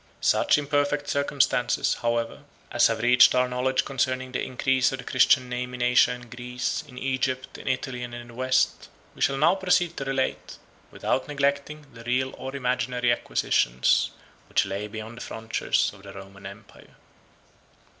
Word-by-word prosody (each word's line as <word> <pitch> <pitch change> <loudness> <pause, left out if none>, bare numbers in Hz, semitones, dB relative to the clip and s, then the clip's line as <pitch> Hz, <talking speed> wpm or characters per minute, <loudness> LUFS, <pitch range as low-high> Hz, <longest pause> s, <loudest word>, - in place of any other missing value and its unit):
Such - - +3
imperfect 145 0 0
circumstances, 140 -3 +1
however, 115 -1 -1 0.3
as - - +5
have 115 -1 -2
reached 125 +1 +6
our 125 0 +3
knowledge 130 +1 0
concerning 130 -1 -1
the 125 - -2
increase 130 0 +1
of 135 - -3
the 125 - -9
Christian 130 0 +3
name 125 0 -4
in 125 - -3
Asia 125 0 +5
and 125 -1 -7
Greece, 125 +5 -3
in 125 -3 -14
Egypt, 130 0 -2
in - - -11
Italy, 130 -1 -2
and 120 0 -6
in 120 0 -9
the - - -12
West, 130 +1 0 0.2
we - - -14
shall 135 - +2
now 150 - +4
proceed 180 -3 +1
to - - -3
relate, 135 -1 -2 0.3
without 130 - -2
neglecting 140 +1 -1
the 115 - -12
real 130 +2 0
or 135 +1 -6
imaginary 125 -1 0
acquisitions 65 - +1 0.4
which - - +2
lay 100 +2 -4
beyond 110 +2 -8
the - - -9
frontiers 115 0 -1
of 100 - -15
the 100 0 -11
Roman 100 0 -11
empire. 100 +2 -14
125 Hz, 165 wpm, -25 LUFS, 120-135 Hz, 0.4 s, reached